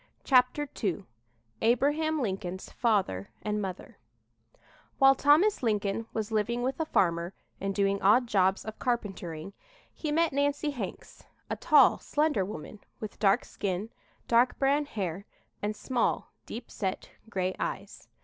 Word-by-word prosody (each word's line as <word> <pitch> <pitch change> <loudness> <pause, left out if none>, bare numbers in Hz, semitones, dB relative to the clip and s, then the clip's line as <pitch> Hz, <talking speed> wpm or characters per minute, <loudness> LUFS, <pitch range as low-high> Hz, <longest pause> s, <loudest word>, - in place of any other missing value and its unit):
CHAPTER 255 +3 +3 0.2
II 195 -1 -1 0.6
ABRAHAM 295 +7 +2
LINCOLN'S 190 -3 -4
FATHER 195 - 0
AND 210 0 -1
MOTHER 190 -3 -6 1.0
While 270 -1 +7
Thomas 300 +10 +4
Lincoln 210 -1 0
was 220 0 -3
living 230 +3 0
with 265 +3 -2
a 320 - -1
farmer 170 - +1 0.2
and 195 0 -2
doing 200 -1 +1
odd 220 +6 +5
jobs 190 -3 +2
of 220 0 -7
carpentering, 195 -7 -3 0.4
he 305 - -4
met 330 0 +2
Nancy 285 +1 +1
Hanks, 225 -9 -7 0.3
a - - +1
tall, - - +5
slender 295 -9 +1
woman, 190 +1 -7 0.2
with 215 - -7
dark 195 -2 +3
skin, 200 +3 -3 0.4
dark 240 +2 +3
brown 280 +2 +2
hair 195 - -4 0.3
and 210 +1 -2
small, 250 +2 -1 0.2
deep 235 +1 -7
set 190 -3 -4 0.2
gray 185 -3 -1
eyes. - - -5
220 Hz, 135 wpm, -29 LUFS, 195-270 Hz, 1.0 s, While